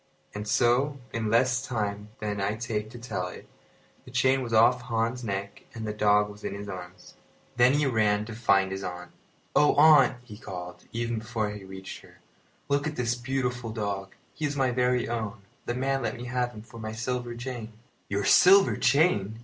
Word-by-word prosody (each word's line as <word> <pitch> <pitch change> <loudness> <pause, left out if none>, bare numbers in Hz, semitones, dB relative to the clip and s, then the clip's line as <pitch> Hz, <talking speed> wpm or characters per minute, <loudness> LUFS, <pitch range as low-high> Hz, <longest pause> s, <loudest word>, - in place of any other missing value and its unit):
And 105 +1 -5
so, 125 +6 +2 0.2
in 115 -2 -1
less 125 +2 +3
time 105 -4 -3
than 105 -1 -3
I 100 +2 0
take 110 -1 -3
to 120 - -10
tell 115 -6 -4
it, 90 - -10 0.6
the - - -14
chain 130 +2 +2
was 120 -2 -5
off 115 +2 +5
Hans's 115 +1 -1
neck 100 -2 -5
and 110 -1 -5
the 105 - -3
dog 105 0 +3
was 105 0 -12
in - - -4
his 100 0 -7
arms. 90 -2 -9 0.4
Then 125 +2 +5
he 145 0 +2
ran 105 -4 +2
to 115 - -7
find 100 -4 +2
his 95 0 -4
aunt. 90 -1 -6 0.4
"Oh, 150 - +5
aunt!" 145 -4 +6
he 110 -4 -12
called, 90 -3 -8
even 115 -1 -2
before 110 -2 -2
he 105 -1 -8
reached 95 0 -9
her, - - -18 0.5
"look 140 +1 +1
at 150 - -4
this 120 -1 0
beautiful 125 -1 -2
dog. 100 -3 -4 0.2
He 155 - -3
is 145 0 -2
my 135 -2 +2
very 125 0 +1
own. 110 -3 -4 0.2
The 120 - -1
man 135 +1 0
let 120 - -2
me 120 - -7
have 125 -1 -1
him 105 - -10
for 115 0 -13
my 110 0 -5
silver 120 +1 -3
chain." 120 -2 -6 0.4
"Your 100 0 -1
silver 195 - +6
chain!" 110 - +2
115 Hz, 195 wpm, -27 LUFS, 105-125 Hz, 0.6 s, aunt